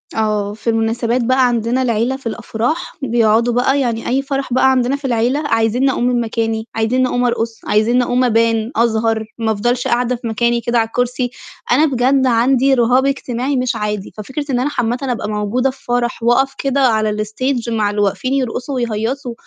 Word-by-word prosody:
آه. 210 -2 0
في 220 +2 -4
المناسبات 230 +2 0
بقى 255 +1 +3
عندنا 240 +2 0
العيلة 235 +1 0
في 270 - -7
الأفراح 240 +9 -3
بيقعدوا 235 -1 +2
بقى 265 +3 +2
يعني 230 -3 -2
أي 265 +3 +1
فرح 275 -2 -3
بقى 265 +1 +4
عندنا 255 +1 +1
في 280 -1 -8
العيلة، 245 +3 +1
عايزينّي 230 +4 +2
أقوم 240 - -2
من 245 -1 +1
مكاني 225 0 -2
عايزينّي 250 +3 +1
أقوم 245 0 0
أرقص 230 -1 -2
عايزينّي 230 +4 +2
أقوم 250 +1 +1
أبان 230 0 +1
أظهر 225 -1 +1
ما 225 -1 0
أفضلش 240 +4 0
قاعدة 245 +1 +1
في 235 0 -6
مكاني 235 +1 0
كده 235 0 +1
على 225 - +1
الكرسي، 245 +1 -1 0.4
أنا 295 +6 +5
بجد 265 0 +2
عندي 255 +3 +3
رهاب 250 +2 +3
اجتماعي 265 0 -2
مش 250 -1 0
عادي، 210 -2 -4
ففكرة 265 +7 -5
إن 245 - +1
أنا 275 +4 0
عامةً 245 -4 -1
أبقى 240 -5 -2
موجودة 210 +5 0
في 260 0 -11
فرح 240 -1 -1
واقف 265 +3 +2
كده 275 0 0
على 215 -2 0
الstage 240 +2 -2
مع 215 -2 +1
اللي 205 0 -1
واقفين 255 +6 0
يرقصوا 260 +1 -2
ويهيّصوا 235 +2 -2
240 Hz, 185 wpm, -17 LUFS, 225-255 Hz, 0.4 s, أنا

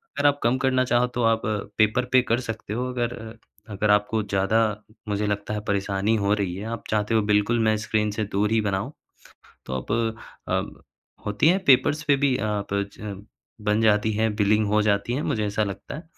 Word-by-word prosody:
अगर 140 +1 -1
आप 145 0 +2
कम 120 +3 +2
करना 130 -1 +2
चाहो 125 0 +2
तो 120 - 0
आप 115 0 +3 0.4
पेपर 110 +3 +3
पे 130 0 +6
कर 115 0 +1
सकते 115 -3 -6
हो 125 +3 -2
अगर 120 -1 -2
अ, 110 0 -9 0.4
अगर 105 +1 +1
आपको 105 +2 +2
ज़्यादा 100 +1 0 0.5
मुझे 105 0 -1
लगता 105 +1 -2
है 105 - -2
परेशानी 100 +2 0
हो 100 0 +1
रही 100 -4 -1
है 100 +3 -6
आप 115 - -7
चाहते 105 +1 0
हो 110 - +4
बिल्कुल 105 +3 +2
मैं 110 - +3
स्क्रीन 105 -1 0
से 110 +1 -2
दूर 105 +2 +1
ही 115 - +3
बनाऊँ। 100 +4 -2 0.7
तो 65 - -5
आप 65 +8 -4 0.6
अ, - - +1 0.6
होती 105 +7 +2
है 185 - +4
पेपर्स 140 +3 +4
पे 145 -1 +3
भी 135 -2 +3
अ, - - -3 0.3
प 100 0 +1
छम 100 -1 -8 0.4
बन 105 +1 +2
जाती 110 0 +3
है 110 +2 +1
बिलिंग 105 +1 +2
हो 105 +1 +2
जाती 100 +2 +1
है 135 - -1
मुझे 110 -2 -1
ऐसा 105 +1 0
लगता 100 +5 -6
है। 155 - -8
110 Hz, 210 wpm, -24 LUFS, 105-120 Hz, 0.7 s, पे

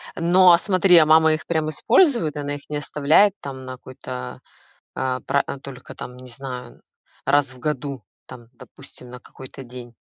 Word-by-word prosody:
Но, 180 +2 +5
а 170 - +7
смотри, 185 -2 +4
а 160 - +7
мама 160 0 +5
их 155 - -4
прям 160 -2 -1
использует, 235 - +2
она 145 0 -4
их 145 - -13
не 150 - -3
оставляет, 150 +7 +3
там, 130 -2 -8
на 130 - -7
какой-то, 130 0 -9 0.5
а, 130 -1 -2
пра 140 - 0
а 140 - -6
только, 135 -2 -11
там, 125 +1 -9
я 125 - -11
не 125 - -11
знаю, 125 -2 -9 0.4
раз 140 -2 +2
в 125 - -16
году, 140 -5 -4 0.2
там, 120 -2 -13
допустим, 125 +1 -13
на 125 - -10
какой-то 130 +2 -12
день? 120 -1 -11
140 Hz, 185 wpm, -22 LUFS, 130-155 Hz, 0.5 s, а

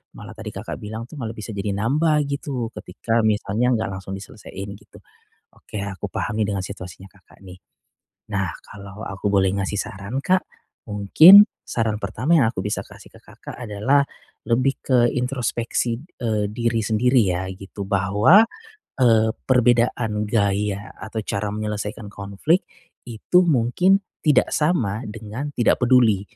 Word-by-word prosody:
malah - - -10
tadi - - -9
Kakak - - -6
bilang 110 +2 -6
tuh 140 +5 -11
malah 115 -2 -5
bisa 105 0 -7
jadi 100 -1 -3
nambah 150 +8 +2
gitu 140 -4 -4
ketika 115 +5 -2
misalnya 110 +3 +1
nggak 110 -1 -2
langsung 95 0 -7
diselesain 100 0 -9
gitu, 100 +1 -15 0.5
oke 105 - -9
aku 100 -2 -6
paham 105 - -3
nih 105 - -1
dengan 95 -2 -3
situasinya 90 -1 -9
Kakak 100 - -22
nih. 90 -1 -13 0.7
Nah 100 -4 -2
kalau 100 +1 -11
aku 100 0 -6
boleh 100 -2 +3
ngasih 100 +1 -2
saran 100 +8 -6
Kak, 185 +3 +1 0.4
mungkin 120 - +8 0.2
saran 110 -2 -1
pertama 155 +9 0
yang 130 - +4
aku - - -12
bisa 105 +2 -3
kasih - - -15
ke - - -17
Kakak - - -11
adalah 125 +5 +1 0.4
lebih 130 +3 +1
ke 130 -2 +2 0.2
introspeksi 125 -2 -1 0.2
e 105 -4 -1
diri 115 +1 -1
sendiri 115 +4 +3
ya 95 -2 -1
gitu 100 +1 -8
bahwa 100 - +5 0.5
e 115 -3 +3
perbedaan 120 -3 +1
gaya 100 -1 -1
atau 110 +1 -7
cara 100 +1 -2
menyelesaikan 105 +1 -4
konflik 100 - -1 0.4
itu 120 +10 +1
mungkin 170 +5 +3 0.2
tidak 150 -3 +3
sama 125 - 0
dengan 115 +6 -6
tidak 120 - +2
peduli. 120 -6 +4
110 Hz, 145 wpm, -22 LUFS, 100-125 Hz, 0.7 s, mungkin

